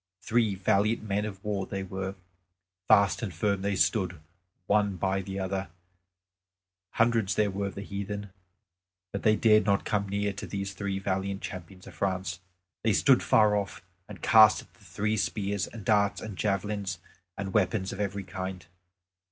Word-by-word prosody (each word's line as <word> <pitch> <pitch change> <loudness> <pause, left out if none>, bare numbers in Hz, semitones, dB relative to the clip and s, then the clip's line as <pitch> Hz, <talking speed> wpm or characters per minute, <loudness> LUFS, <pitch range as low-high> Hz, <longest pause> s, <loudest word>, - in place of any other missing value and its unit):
Three 115 -3 +2
valiant 105 +3 +1
men 105 0 -1
of 100 -2 -7
war 100 -2 -2
they 95 -1 -4
were; 95 0 -4 0.7
fast 100 +2 +5
and 110 -5 -3
firm 100 +4 0
they 100 0 0
stood 95 -3 +1 0.5
one 105 -1 +2
by 95 +2 0
the 95 0 -6
other; 95 0 -2 1.2
hundreds 115 -4 +2
there 105 -2 +2
were 100 +1 -2
of 100 - -7
the 100 - -5
heathen, 100 0 -5 0.8
but 100 - -3
they 110 0 +4
dared 105 -1 +5
not 100 0 +1
come 100 -2 0
near 100 0 -1
to 100 - -7
these 100 -1 -4
three 100 0 -3
valiant 95 0 -2
champions 90 0 -8
of - - -11
France. 95 -2 -2 0.4
They 110 -2 +2
stood 135 +3 +5
far 105 -1 +4
off, 100 -4 -3 0.3
and 100 -4 -10
cast 110 -1 +7
at - - -25
the - - -23
three 105 +1 -1
spears 100 -2 -1
and 110 -4 -10
darts 100 -1 +3
and 110 -3 -7
javelins 100 -1 -1 0.4
and 100 -1 -4
weapons 100 -2 +1
of 95 - -8
every 100 -1 -2
kind. 95 -1 -6
100 Hz, 170 wpm, -28 LUFS, 95-105 Hz, 1.2 s, cast